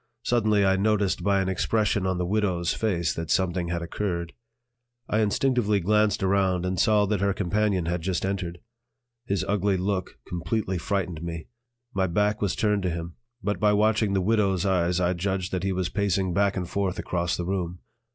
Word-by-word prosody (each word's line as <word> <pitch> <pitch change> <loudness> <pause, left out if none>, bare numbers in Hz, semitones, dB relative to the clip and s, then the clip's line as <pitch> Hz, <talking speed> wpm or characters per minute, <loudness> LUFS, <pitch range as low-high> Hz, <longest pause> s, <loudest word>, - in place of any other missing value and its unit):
Suddenly 110 -5 +2
I 95 0 +3
noticed 105 -1 +1
by 100 -1 +3
an 95 - -1
expression 100 +1 +1
on 95 -1 0
the 90 - -1
"widow's" 95 -3 0
face 90 -7 0
that 80 -1 -5
something 90 -2 +1
had 85 0 -2
occurred. 85 -1 -3 0.7
I 110 - +1
instinctively 110 0 +2
glanced 105 +2 +2
around 95 -2 +2
and 90 -1 -1
saw 105 +1 +4
that 100 -1 -1
her 100 -1 +1
companion 100 -1 0
had 85 0 -1
just 90 +1 -1
entered. 90 -3 -3 0.7
His 100 -3 0
ugly 100 -1 +1
look 95 0 -2
completely 90 +2 -2
frightened 90 -3 -2
me. 85 -2 -6 0.4
My 95 -1 +1
back 105 +4 +1
was 100 -3 0
turned 105 -2 +1
to 90 - 0
him, 85 0 -5 0.3
but 105 +1 -1
by 105 -1 +4
watching 105 0 +2
the 95 - +2
"widow's" 100 -2 +1
eyes 90 -2 +2
I 90 0 +2
judged 95 0 -2
that 90 - -1
he 95 +1 -1
was 90 -1 -1
pacing 95 -3 0
back 100 +1 +2
and 90 -2 -2
forth 100 -1 -1
across 85 -1 -1
the 85 - -3
room. 90 -2 -2
95 Hz, 185 wpm, -26 LUFS, 90-105 Hz, 0.7 s, saw